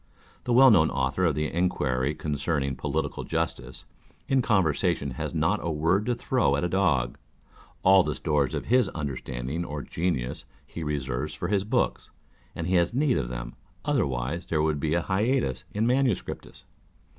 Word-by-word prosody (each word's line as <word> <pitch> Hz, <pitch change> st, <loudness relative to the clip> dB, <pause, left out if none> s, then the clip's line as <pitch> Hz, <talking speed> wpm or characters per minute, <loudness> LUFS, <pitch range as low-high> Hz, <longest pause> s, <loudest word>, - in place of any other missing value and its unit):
The 125 Hz, -, +1 dB
well 130 Hz, +1 st, +8 dB
known 80 Hz, -7 st, +5 dB
Author 65 Hz, +8 st, 0 dB
of 80 Hz, -, +2 dB
the 75 Hz, 0 st, 0 dB
Enquiry 75 Hz, -6 st, 0 dB
concerning 70 Hz, -2 st, -2 dB
Political 65 Hz, -, -2 dB
Justice, 80 Hz, -6 st, -3 dB, 0.4 s
in 135 Hz, -1 st, +3 dB
conversation 85 Hz, -, +1 dB
has 65 Hz, -, -5 dB
not 80 Hz, +7 st, +2 dB
a 85 Hz, -, -2 dB
word 85 Hz, +7 st, +1 dB
to 120 Hz, -, +1 dB
throw 120 Hz, -, +1 dB
at 70 Hz, -, -1 dB
a -, -, +2 dB
dog; 75 Hz, -11 st, +1 dB, 0.6 s
all 95 Hz, 0 st, +7 dB
the 75 Hz, -4 st, -2 dB
stores 75 Hz, -4 st, 0 dB
of -, -, -4 dB
his 125 Hz, -2 st, +3 dB
understanding 70 Hz, 0 st, -4 dB
or 75 Hz, -3 st, -5 dB
genius 80 Hz, -8 st, -2 dB, 0.2 s
he 85 Hz, -, -8 dB
reserves 75 Hz, 0 st, -3 dB
for 85 Hz, -, -4 dB
his 100 Hz, -2 st, +1 dB
books, 105 Hz, -, -1 dB, 0.5 s
and 85 Hz, -, -3 dB
he 90 Hz, +1 st, +2 dB
has 85 Hz, +7 st, +1 dB
need 140 Hz, -2 st, +2 dB
of -, -, -3 dB
them, -, -, -6 dB, 0.3 s
otherwise 65 Hz, +6 st, -1 dB
there 75 Hz, -2 st, +1 dB
would 75 Hz, -2 st, 0 dB
be 75 Hz, +2 st, 0 dB
hiatus 95 Hz, -, 0 dB
in 105 Hz, +2 st, 0 dB
manuscriptis. 125 Hz, -3 st, -1 dB
80 Hz, 165 wpm, -27 LUFS, 70-95 Hz, 0.6 s, well